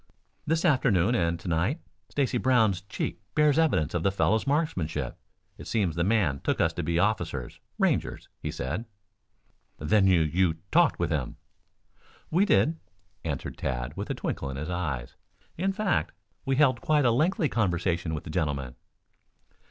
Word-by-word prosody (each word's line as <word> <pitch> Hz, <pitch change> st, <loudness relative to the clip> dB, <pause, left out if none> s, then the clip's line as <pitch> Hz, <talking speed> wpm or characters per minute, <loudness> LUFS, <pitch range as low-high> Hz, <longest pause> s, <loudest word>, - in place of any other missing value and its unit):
"This 165 Hz, +3 st, +1 dB
afternoon 125 Hz, -, +3 dB
and 85 Hz, -6 st, +1 dB
to 90 Hz, -, -9 dB
night. 90 Hz, -, 0 dB, 0.3 s
Stacy 130 Hz, -4 st, 0 dB
Brown's 110 Hz, -8 st, +3 dB
cheek 100 Hz, -, -4 dB
bears 150 Hz, 0 st, +4 dB
evidence 145 Hz, -, +2 dB
of 85 Hz, -, 0 dB
the 100 Hz, -, +3 dB
fellow's 110 Hz, +5 st, +1 dB
marksmanship. 90 Hz, -, -1 dB, 0.4 s
It -, -, -9 dB
seems 95 Hz, -8 st, 0 dB
the 85 Hz, -, +1 dB
man 90 Hz, -9 st, +2 dB
took -, -, -1 dB
us -, -, +2 dB
to -, -, -3 dB
be 85 Hz, 0 st, -1 dB
officers 90 Hz, -, -1 dB, 0.2 s
Rangers, -, -, 0 dB
he -, -, -3 dB
said." 85 Hz, -, -4 dB, 0.9 s
"Then 95 Hz, +5 st, +3 dB
you 90 Hz, -3 st, +5 dB
you 80 Hz, +2 st, +2 dB, 0.2 s
talked 170 Hz, -2 st, +4 dB
with 85 Hz, 0 st, -1 dB
him?" 70 Hz, -6 st, -2 dB, 1.0 s
"We 180 Hz, +6 st, +4 dB
did," 165 Hz, -5 st, +2 dB, 0.4 s
answered 75 Hz, -5 st, -4 dB
Tad -, -, -3 dB
with -, -, -5 dB
a -, -, -1 dB
twinkle 70 Hz, -, -3 dB
in 65 Hz, -, -5 dB
his 75 Hz, +5 st, -4 dB
eyes. 75 Hz, -8 st, -3 dB, 0.4 s
"In 190 Hz, +4 st, 0 dB
fact 195 Hz, -1 st, 0 dB, 0.3 s
we 135 Hz, -, +2 dB
held 130 Hz, -4 st, +3 dB
quite 150 Hz, 0 st, +2 dB
a 120 Hz, -, +5 dB
lengthy 155 Hz, +6 st, +2 dB
conversation 85 Hz, -, 0 dB
with 75 Hz, -, -5 dB
the 80 Hz, -, -7 dB
gentleman." 70 Hz, -7 st, -2 dB
95 Hz, 160 wpm, -27 LUFS, -, 1.0 s, you